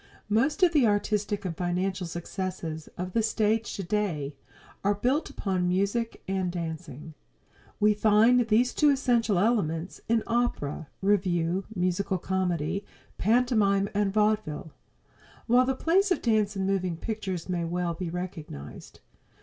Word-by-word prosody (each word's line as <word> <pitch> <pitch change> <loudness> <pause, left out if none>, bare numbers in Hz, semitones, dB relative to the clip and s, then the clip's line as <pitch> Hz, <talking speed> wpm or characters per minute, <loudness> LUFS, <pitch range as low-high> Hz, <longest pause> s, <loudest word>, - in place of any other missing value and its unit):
Most 270 - +2
of 345 -2 +5
the 280 -7 +5
artistic 205 -1 0
and 170 -3 -3
financial 180 +1 -1
successes 170 -2 -5
of 180 +1 -4
the 230 - +3
stage 220 0 0
today 185 -7 -2 0.5
are 205 +1 +2
built 255 +9 0
upon 185 -3 -1
music 200 +6 -1
and 190 -2 -1
dancing. 160 -3 -6 0.7
We 210 0 +5
find 220 +3 +4
these 235 +3 +3
two 300 - +4
essential 240 -7 +2
elements 180 -5 0
in 230 -1 +3
opera, 230 -11 -1 0.2
revue, 185 -2 +1
musical 185 +1 0
comedy, 185 0 -1 0.4
pantomime 210 -3 +3
and 205 -1 +1
vaudeville, 210 -7 0 0.7
while 250 +2 +4
the 265 - +1
place 375 +8 +2
of 365 - 0
the 235 - +2
dance 210 -1 +1
in 190 - -1
moving 185 -3 0
pictures 190 -3 -4
may 175 -2 -1
well 175 0 -1
be 170 +1 -4
recognized. 165 - -7
195 Hz, 135 wpm, -27 LUFS, 175-220 Hz, 0.7 s, of